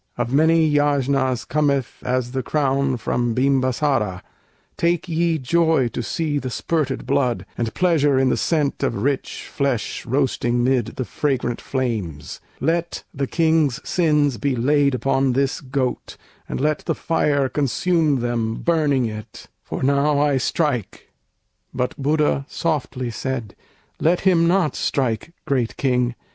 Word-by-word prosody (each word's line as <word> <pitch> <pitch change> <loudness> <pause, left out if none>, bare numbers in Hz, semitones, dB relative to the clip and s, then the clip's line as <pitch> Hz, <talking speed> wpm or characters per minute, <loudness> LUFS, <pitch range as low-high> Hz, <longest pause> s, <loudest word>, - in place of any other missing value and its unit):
Of 120 +1 -2
many 160 +2 +4
yajnas 140 -4 +1
cometh 140 -4 0
as 125 -1 -1
the 130 0 -2
crown 135 -1 0
From 120 0 -1
Bimbasâra: 130 -6 +1 0.5
take 170 +1 0
ye 165 0 +1
joy 160 -1 +2
to 120 - -4
see 150 +4 -1
The 130 - -4
spirted 140 +1 -2
blood, 125 -9 0
and 115 -1 -2
pleasure 155 -6 +3
in 130 0 +3
the - - +2
scent 150 -4 0
Of 135 -4 0
rich 140 0 -2
flesh 135 -6 -2
roasting 120 -2 +1
'mid 130 -1 +1
the 130 - -3
fragrant 130 -5 -1
flames; 105 - -3 0.2
Let 170 +1 -1
the 140 0 -2
King's 160 -5 +2
sins 150 -6 +2
be 140 -2 0
laid 140 +2 +2
upon 135 0 +1
this 135 +1 0
goat, 130 -2 -3 0.3
And - - -3
let 150 +2 0
the - - 0
fire 145 -4 +1
consume 150 +1 +1
them 115 -2 -1
burning 150 -6 +1
it, 110 0 -8
For - - -5
now 140 +2 +2
I 145 -2 +2
strike." 130 - -2 0.6
But 125 +6 -1
Buddha 145 -1 +1
softly 130 -6 -2
said, 120 -3 -4 0.4
"Let 170 +3 +2
him 175 -3 +4
not 175 -3 +2
strike, 130 +4 -1
great 125 -5 -1
King!" 125 -3 +1
135 Hz, 140 wpm, -21 LUFS, 125-150 Hz, 0.6 s, many